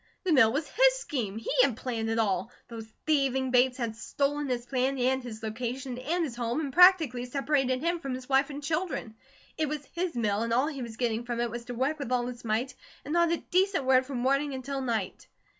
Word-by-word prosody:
The 365 -4 +2
mill 225 -6 +6
was 290 +4 -2
his - - +4
scheme. 245 - -3
He 225 - -4
had 250 -4 +2
planned 230 -4 -3
it 225 - 0
all. 200 -2 0 0.2
Those 225 -1 -9
thieving 265 -4 +1
Bates 250 0 +3
had 230 -3 -3
stolen 285 +5 -1
his 245 -1 -2
plan, 260 +2 0
and 260 +1 +1
his 225 -3 -9
location, 245 +3 -4
and 330 +7 -1
his 270 -7 -4
home, 235 +3 -2
and 280 -4 -3
practically 330 -9 +6
separated 270 0 0
him 340 +1 0
from 270 -4 -4
his 255 0 -9
wife 275 +1 +3
and 290 0 -7
children. 310 -7 -2 0.5
It 310 -2 +1
was 295 -1 -4
his 345 -3 -2
mill, 210 -3 0
and 230 0 -1
all 255 +4 +3
he 290 -3 -4
was 230 -2 -7
getting 235 -1 -1
from 240 -1 -4
it 240 -1 -1
was 235 0 -6
to 245 - -6
work 275 +6 -1
with 270 -3 -5
all 245 -1 +1
his 245 0 -7
might, 230 +4 -1 0.3
and 295 - -4
not 340 -1 +3
a 340 - +2
decent 375 -5 +2
word 260 0 +4
from 275 -2 -4
morning 275 +3 +1
until 270 +1 -4
night. 225 -7 -3
260 Hz, 225 wpm, -28 LUFS, 235-290 Hz, 0.5 s, mill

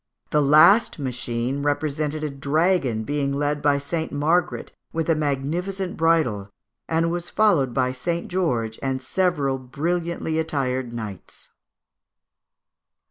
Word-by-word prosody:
The 150 - +3
last 155 +10 +6
machine 125 -1 -2
represented 150 +1 -1
a 150 - -2
dragon 140 -4 +1
being 140 +2 -1
led 145 +1 -1
by 145 -1 +3
St. 160 +3 -3
Margaret 160 +5 0 0.2
with 165 0 0
a - - +3
magnificent 165 +7 -2
bridle, 155 -12 +1 0.4
and 165 +1 +1
was 175 0 -3
followed 170 - +3
by 130 0 +1
St. 170 +6 -3
George 120 -12 -1
and 135 -1 -1
several 140 -2 0
brilliantly 160 +5 -2
attired 130 -6 -1
knights. 110 -5 -8
145 Hz, 120 wpm, -23 LUFS, 130-165 Hz, 0.4 s, last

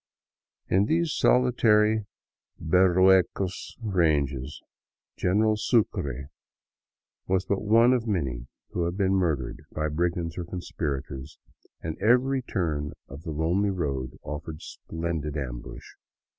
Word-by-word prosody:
In 95 +2 +3
these 165 +4 +1
solitary 110 -4 +3 0.5
Berruecos 95 +2 +3
ranges 75 - 0 0.6
General 110 +4 +2
Sucre 70 - 0 1.0
was 95 0 +1
but 100 +1 -1
one 115 +4 +5
of 120 -2 0
many 65 - -2 0.2
who 85 - -1
had 85 +2 -3
been 95 -1 +2
murdered 80 -10 0
by 75 0 -2
brigands 85 +1 -1
or - - -2
conspirators, 75 -5 -5 0.5
and 80 0 -4
every 125 +5 +3
turn 75 - -2
of 70 +2 -10
the 80 - -6
lonely 85 +7 +1
road 70 -9 -3
offered 75 +2 -6
splendid 80 -2 -4
ambush. - - -6
85 Hz, 110 wpm, -27 LUFS, 75-100 Hz, 1.0 s, one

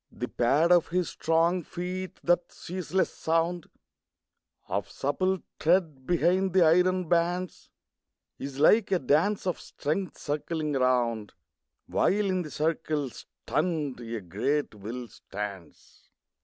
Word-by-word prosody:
The - - -4
pad 145 +8 +2
of 175 -2 +5
his 180 0 0
strong 165 +3 +1
feet, 180 +2 -5
that 175 0 +2
ceaseless 185 +1 -2
sound 165 +1 0 1.0
Of - - -2
supple 185 +7 -1 0.2
tread 160 -6 +1
behind 180 +2 +2
the 185 -2 +6
iron 180 +2 +3
bands, 175 +2 0 0.7
Is 135 -1 -6
like 195 +7 +5
a 190 - +4
dance 170 +9 +2
of 180 - -1
strength 160 +3 -3
circling 150 0 -2
around, 120 -5 +1 0.5
While 205 +2 +2
in 185 -2 +1
the 155 - -6
circle, 155 -3 -1
stunned, 150 -4 -3
a 115 -1 -5
great 110 - -1
will 115 +4 -6
stands. 100 -4 -9
165 Hz, 120 wpm, -28 LUFS, 140-180 Hz, 1.0 s, the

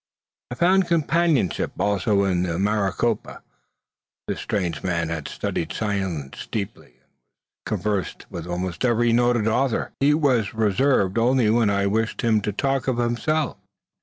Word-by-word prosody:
I 125 - -5
found 185 +5 +3
companionship 165 - +1
also 100 0 +2
in 90 -3 +1
the 85 -2 -1
Maricopa. 105 +2 -1 0.8
This - - -3
strange 90 -7 -2
man 85 -3 -1
had 80 -3 -4
studied 80 - -3
science 95 -10 -3
deeply, 105 -3 -4
and - - -34
was - - -36 0.7
conversant 105 -4 -2
with 85 0 -6
almost 90 +1 -3
every 120 -1 +3
noted 120 -2 +2
author. 120 +2 0
He 145 +2 +4
was 125 -9 +1
reserved 110 -1 +2
only 120 -2 +3
when 115 -2 +3
I 100 0 +1
wished 110 +4 -1
him 110 -2 +3
to 105 - -2
talk 135 +5 -1
of 130 -2 0
himself. 125 +6 0
110 Hz, 145 wpm, -23 LUFS, 95-125 Hz, 0.8 s, He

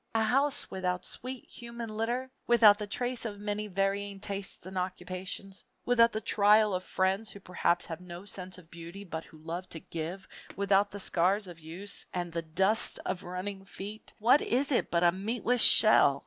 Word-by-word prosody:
A 225 - +3
house 275 +5 +1
without 180 -1 -2
sweet 255 0 -6
human 235 -1 -8
litter, 240 +4 -2 0.2
without 225 -3 +7
the 210 - -4
trace 245 +3 -3
of 210 -3 -5
many 210 +1 -2
varying 195 +1 -1
tastes 200 -3 -5
and 190 +1 -8
occupations, 185 +1 -5 0.2
without 235 -1 +5
the 215 - -2
trail 210 0 +4
of 185 0 -2
friends 190 +4 0
who 200 - -9
perhaps 175 -2 0
have 165 +1 -7
no 180 +1 -9
sense 185 -2 -7
of 175 -2 -16
beauty 170 +4 -9
but 165 -4 -6
who 155 - -16
love 165 +4 -6
to 165 - -6
give, 170 +5 -6 0.3
without 200 0 +3
the 205 - -7
scars 190 +3 +1
of 175 -3 -11
use, 175 +5 -6
and 175 -1 -2
the 165 0 -2
dust 190 +7 +1
of 180 - -2
running 190 +2 -5
feet 200 +2 -8
what 250 +7 +5
is 275 +4 0
it 255 - +1
but 170 0 +1
a 175 - +6
meatless 225 +5 0
shell! 215 -13 +7
195 Hz, 185 wpm, -30 LUFS, 180-215 Hz, 0.3 s, without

